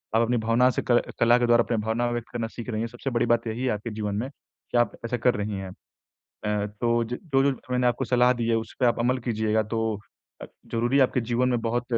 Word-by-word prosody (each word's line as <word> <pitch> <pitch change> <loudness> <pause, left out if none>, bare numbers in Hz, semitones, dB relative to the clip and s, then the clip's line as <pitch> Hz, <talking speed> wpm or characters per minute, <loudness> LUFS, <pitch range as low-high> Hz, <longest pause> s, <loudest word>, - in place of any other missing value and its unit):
आप 115 - +5
अपनी 120 +1 +1
भावना 115 +3 +3
से - - -1
क 120 - +5 0.2
कला 120 +1 +5
के 120 - +2
द्वारा 120 0 +5
अपनी 115 - -1
भावना 120 +2 0
व्यक्त 120 -1 -4
करना 115 -2 -2
सीख 120 +2 -8
रही 110 -1 -2
हैं, 115 - -1
सबसे 120 +3 -5
बड़ी 120 0 +1
बात 120 -1 +1
यही 115 +3 -3
है 130 - +1
आपके 105 +3 -5
जीवन 105 -1 -3
में 120 +6 -2
कि 130 - -8
आप 120 -2 +3
ऐसा 125 +1 -1
कर 125 +2 +2
रही 105 -1 -3
हैं। 95 -1 -6 0.5
अ, 105 -1 -3
तो 120 0 +2
ज 120 +2 -4 0.2
जो-जो 135 0 +3
मैंने 125 0 +2
आपको 120 - 0
सलाह 125 0 +4
दी 120 -1 -2
है, 115 - +3
उस 110 -1 -5
पे 125 - +3
आप 120 0 +2
अमल 125 +2 +2
कीजिएगा 110 -1 +1
तो 110 +2 -3 0.6
अ, - - -5 0.3
ज़रूरी 120 +4 +2
आपके 130 -1 +3
जीवन 120 +2 +1
में 120 -2 +1
बहुत 120 +1 -1
120 Hz, 250 wpm, -26 LUFS, 110-125 Hz, 0.6 s, आप